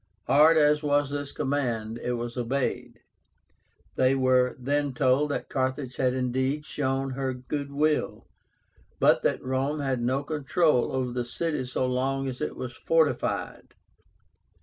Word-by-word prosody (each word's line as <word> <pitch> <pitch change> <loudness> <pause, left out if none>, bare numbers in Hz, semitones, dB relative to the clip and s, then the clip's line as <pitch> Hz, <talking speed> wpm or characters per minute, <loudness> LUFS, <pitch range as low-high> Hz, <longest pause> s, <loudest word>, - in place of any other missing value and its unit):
Hard 155 +3 +6
as 150 -1 +4
was 145 -1 +1
this 145 -1 -4
command, 120 -5 -2
it 125 - -2
was 120 0 -4
obeyed. 125 -1 -2 1.0
They 130 +1 +3
were 130 -1 +3
then 140 +1 -1
told 140 +2 +2
that 145 - -3
Carthage 130 -1 -2
had 130 -1 +1
indeed 130 +3 -1
shown 135 -2 -2
her 130 0 -2
good 140 +3 -5
will, 150 +2 0 0.7
but - - +4
that - - 0
Rome 135 +3 -1
had 135 -3 -1
no 130 +4 0
control 150 -1 +1
over 130 -2 -1
the 125 0 -2
city 150 +2 -2
so 125 +1 -1
long 135 +2 -1
as 130 -1 -5
it - - -3
was 125 -1 -6
fortified. 160 -2 0
135 Hz, 145 wpm, -27 LUFS, 125-145 Hz, 1.0 s, Hard